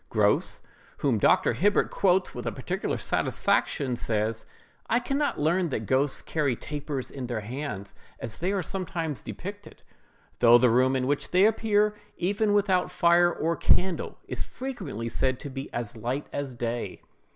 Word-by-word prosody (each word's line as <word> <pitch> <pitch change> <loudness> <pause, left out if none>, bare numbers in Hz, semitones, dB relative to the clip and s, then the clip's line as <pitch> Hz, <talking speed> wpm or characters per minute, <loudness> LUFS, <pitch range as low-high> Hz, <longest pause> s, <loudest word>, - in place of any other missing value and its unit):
Grose, - - +2 0.3
whom 125 -6 +1
Dr. - - +4
Hibbert 200 - +2
quotes 185 -1 +2
with - - -6
particular - - -2
satisfaction, 130 -4 +1
says: 110 -1 -2 0.4
"I 235 - +3
can 275 +3 -2
not 295 - 0
learn 170 +4 +2
that 110 -5 -3
ghosts 135 +4 +1
carry 145 -6 0
tapers 145 0 -5
in 130 -3 -5
their 120 -3 -3
hands, 110 -4 -5 0.3
as 110 - -6
they 180 +3 0
are 195 -2 0
sometimes 165 -4 -3
depicted; 205 +2 -8 0.6
though 120 0 +8
the 120 -1 +4
room 130 +2 +3
in 130 -1 0
which 145 +2 -1
they 185 +2 +5
appear, 210 -1 +3 0.2
even 205 +4 +1
when 205 - +3
without 190 -3 +2
fire 175 -1 +4
or 170 0 -1
candle, 185 +1 +1
is - - -4
frequently 185 - -5
said 130 +2 0
to 145 - -6
be 135 +1 -6
as 120 -1 -4
light 125 +6 -3
as 140 -3 -4
day." 120 0 -4
145 Hz, 165 wpm, -27 LUFS, 125-185 Hz, 0.6 s, though